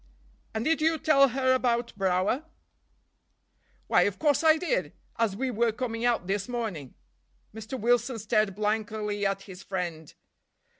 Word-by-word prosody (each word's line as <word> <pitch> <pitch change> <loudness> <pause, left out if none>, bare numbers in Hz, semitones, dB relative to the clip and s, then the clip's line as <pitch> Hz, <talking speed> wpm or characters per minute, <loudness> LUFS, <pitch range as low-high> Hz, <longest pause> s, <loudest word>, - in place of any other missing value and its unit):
"And 220 +2 -2
did 315 0 +2
you 320 +1 +3
tell 290 -3 +5
her 260 +1 +1
about 240 -2 0
Brower?" 195 - 0 1.4
"Why, - - +4
of 200 - +1
course 295 0 +2
I 315 0 +6
did—as 270 - -2
we 260 +4 -2
were 235 0 +1
coming 230 0 -3
out 235 -7 +1
this 195 +1 -2
morning." 210 - -4 0.6
Mr. 220 +4 -6
Wilson 240 +2 +1
stared 215 -2 0
blankly 210 -1 -1
at 195 0 -3
his 190 -2 -11
friend. 170 -6 -5
225 Hz, 140 wpm, -27 LUFS, 200-260 Hz, 1.4 s, I